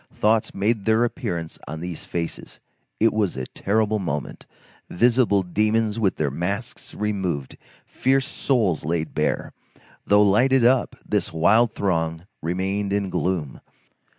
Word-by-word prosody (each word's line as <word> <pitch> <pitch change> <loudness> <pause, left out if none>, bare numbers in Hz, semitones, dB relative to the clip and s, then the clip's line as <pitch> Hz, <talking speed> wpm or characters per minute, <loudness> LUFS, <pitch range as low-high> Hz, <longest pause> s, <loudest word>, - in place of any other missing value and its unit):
Thoughts 110 +1 +1
made 105 +1 0
their 110 +1 +3
appearance 95 - -3
on 80 +1 -5
these 85 -1 -6
faces; 85 -1 -5 0.4
it 115 +1 +4
was 105 -9 0
a 65 - -3
terrible 110 - 0
moment; 75 -7 -4 0.4
visible 115 -2 +3
demons 110 +4 0
with 100 -5 +1
their 75 -3 -1
masks 100 - -4
removed, 95 -10 -2 0.3
fierce 135 +1 +1
souls 115 - 0
laid 80 0 -2
bare. - - -1 0.5
Though 105 0 +5
lighted 125 +5 +4
up, 125 0 +3
this - - 0
wild 105 +8 +3
throng 80 -3 -1 0.2
remained 95 +4 -2
in 100 -2 -1
gloom. 85 -7 -2
100 Hz, 130 wpm, -23 LUFS, 85-110 Hz, 0.5 s, Though